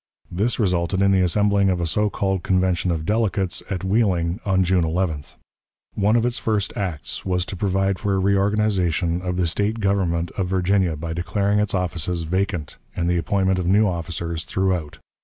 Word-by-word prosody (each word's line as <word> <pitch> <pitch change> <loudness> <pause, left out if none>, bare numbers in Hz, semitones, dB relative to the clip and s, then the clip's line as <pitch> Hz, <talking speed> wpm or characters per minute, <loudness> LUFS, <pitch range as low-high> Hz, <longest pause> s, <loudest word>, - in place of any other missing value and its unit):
This 105 +8 0
resulted 90 -3 0
in 100 - +4
the 95 -1 +3
assembling 100 +2 +2
of 90 -2 0
a 85 - 0
so 105 +6 +1
called 95 -2 -1
convention 90 0 +1
of 80 -2 -2
delegates 105 -3 0
at 95 -2 -3
Wheeling 95 -3 +1
on 95 -1 +2
June 90 -1 +2
11th. 80 -3 -2 0.6
One 105 +2 +2
of 120 0 +2
its 120 -1 -1
first 105 -3 -1
acts 90 -7 -4
was 90 -1 0
to 95 - -6
provide 95 0 0
for 100 -2 0
a - - +1
reorganization 95 -3 +1
of 90 -1 -3
the 90 - +1
State 105 +6 -1
government 90 -5 0
of 95 -2 -2
Virginia 95 -2 +1
by 80 +2 -5
declaring 100 +4 0
its 105 -1 0
offices 90 -1 -2
vacant, 90 -1 -2 0.2
and 85 -1 -1
the 90 0 +2
appointment 95 +1 +1
of 90 - -2
new 105 +3 +4
officers 85 -2 -3
throughout. 95 -5 -1
95 Hz, 180 wpm, -22 LUFS, 85-100 Hz, 0.6 s, in